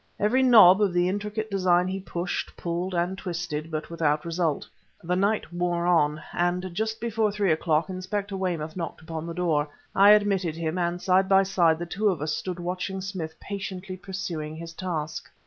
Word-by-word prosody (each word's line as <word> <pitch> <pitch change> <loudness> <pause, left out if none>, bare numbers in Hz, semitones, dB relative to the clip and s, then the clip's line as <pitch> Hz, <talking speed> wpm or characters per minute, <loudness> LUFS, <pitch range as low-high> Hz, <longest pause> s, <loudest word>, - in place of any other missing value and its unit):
Every 225 +6 +3
knob 215 -7 +8
of 200 -4 +2
the 175 0 +2
intricate 210 +3 -3
design 180 -2 +3
he 190 +1 -3
pushed, 175 -1 -4
pulled 175 +2 -3
and 175 +2 0
twisted; 170 -5 -4
but 155 +1 -5
without 155 -1 0
result. 165 -2 -1 0.4
The 180 +2 0
night 200 0 0
wore 175 -1 0
on, 155 -3 +2
and 175 +1 -1
just 220 +3 -2
before 225 -2 0
three 200 -3 +1
o'clock 160 0 +1
Inspector 195 +2 -4
Weymouth 170 -5 -3
knocked 170 -3 -5
upon 160 0 -5
the 170 - -5
door. 160 -4 +1 0.3
I 200 +1 +7
admitted 195 -6 +2
him, 165 +1 -2
and 175 0 -1
side 190 +1 +2
by 195 0 +6
side 175 -4 +3
the 175 - -4
two 205 +5 0
of 180 - -1
us 150 +1 -1
stood 180 -1 -4
watching 180 +2 -3
Smith 185 -4 -6
patiently 190 -1 -6
pursuing 175 -5 -5
his 165 +1 -8
task. 160 -3 -4
180 Hz, 180 wpm, -26 LUFS, 165-195 Hz, 0.4 s, knob